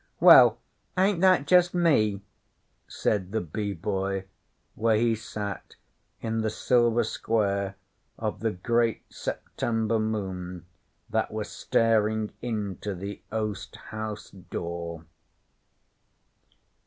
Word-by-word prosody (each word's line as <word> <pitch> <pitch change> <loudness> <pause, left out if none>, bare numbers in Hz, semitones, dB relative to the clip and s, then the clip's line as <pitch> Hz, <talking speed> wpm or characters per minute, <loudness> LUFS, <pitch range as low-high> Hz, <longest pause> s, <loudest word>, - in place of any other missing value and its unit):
'Well, - - +9 0.4
ain't 190 -1 +3
that 185 -6 +5
just 180 +3 +4
me?' 110 - +3 0.6
said 95 -3 -1
the 110 - 0
Bee 100 +4 -3
Boy, 95 -1 -2 0.5
where 110 0 +2
he 115 +1 +3
sat 105 -2 -6 0.5
in 115 0 -1
the 110 - 0
silver 120 +1 +2
square 100 -3 -1 0.4
of - - -3
the 115 +3 0
great 115 +4 0
September 115 -1 -2
moon 95 -5 -3 0.5
that - - +1
was - - -4
staring 110 -1 +1
into 105 -4 -3
the 100 +3 -6
oast 105 -2 -3
house 110 0 -6
door. 85 -2 -6
110 Hz, 105 wpm, -27 LUFS, 100-115 Hz, 0.6 s, Well